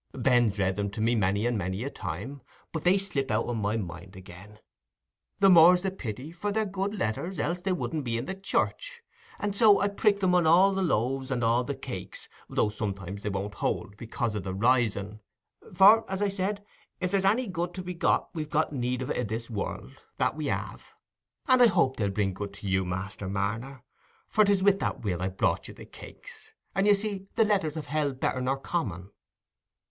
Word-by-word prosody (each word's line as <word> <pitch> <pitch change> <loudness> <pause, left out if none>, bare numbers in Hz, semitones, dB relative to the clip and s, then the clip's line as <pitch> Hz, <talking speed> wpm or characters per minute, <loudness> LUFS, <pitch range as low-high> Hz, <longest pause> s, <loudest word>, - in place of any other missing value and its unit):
"Ben's 120 -5 +3
read 95 0 0
'em 100 0 -1
to 100 - -8
me 115 +2 +2
many 100 -1 +1
and 120 0 +1
many 95 +4 -3
a 140 - -4
time, 120 - -6 0.3
but 160 - -4
they 180 +2 +4
slip 150 -9 -2
out 110 +1 +1
o' 120 - -3
my 110 -1 -1
mind 90 -1 -7
again; 95 +3 -12 0.8
the 200 - +5
more's 180 0 +7
the 190 - 0
pity, 130 - -6
for 180 +5 -3
they're 220 +1 0
good 195 +1 -3
letters, 175 - -2
else 175 +4 -1
they 190 +1 -1
wouldn't 160 -4 -2
be 115 -2 -2
in 115 - -3
the 190 - -4
church; 475 - -2 0.3
and 205 -1 -3
so 210 -2 +6
I 200 - +1
prick 200 0 +1
'em 180 -1 +3
on 175 -3 +3
all 185 +5 +6
the 190 - -1
loaves 135 - 0
and 125 -3 -1
all 115 +2 +3
the 140 +2 -4
cakes, 100 -9 -8 0.2
though 105 - +1
sometimes 100 -2 -5
they 105 - -3
won't 100 +1 -3
hold, 100 - -3
because 115 0 -3
o' - - -1
the 95 -1 -5
rising—for, 120 - +2
as 190 0 -2
I 205 - +2
said, 200 +1 -3 0.3
if 180 -1 -2
there's 195 -1 +1
any 220 +6 +3
good 175 -3 -4
to 185 - -5
be 180 0 -5
got 170 - 0
we've 155 -2 -5 0.2
need 125 -2 -2
of - - -4
it - - -1
i' - - 0
this 115 +2 -5
world—that 105 +5 -4
we 155 -2 -3
have; - - -5 0.5
and 255 -2 +5
I 245 - +9
hope 170 -10 +2
they'll 100 -3 0
bring 95 -1 -1
good 100 +1 -6
to 100 0 -8
you, 95 0 +1
Master 95 +2 -4
Marner, 115 +7 -3 0.4
for 215 - +4
it's 200 -2 +2
wi' 200 - +7
that 195 - -3
will 90 -5 -2
I 95 - 0
brought 95 - 0
you - - -11
the - - -11
cakes; - - -13 0.2
and 195 +2 +1
you 205 - +7
see 200 -1 -4
the 225 - +4
letters 190 -8 0
have 155 - -5
held 145 -3 -1
better 130 - -1
nor 130 +2 0
common." 100 - -4
130 Hz, 210 wpm, -28 LUFS, -, 0.8 s, I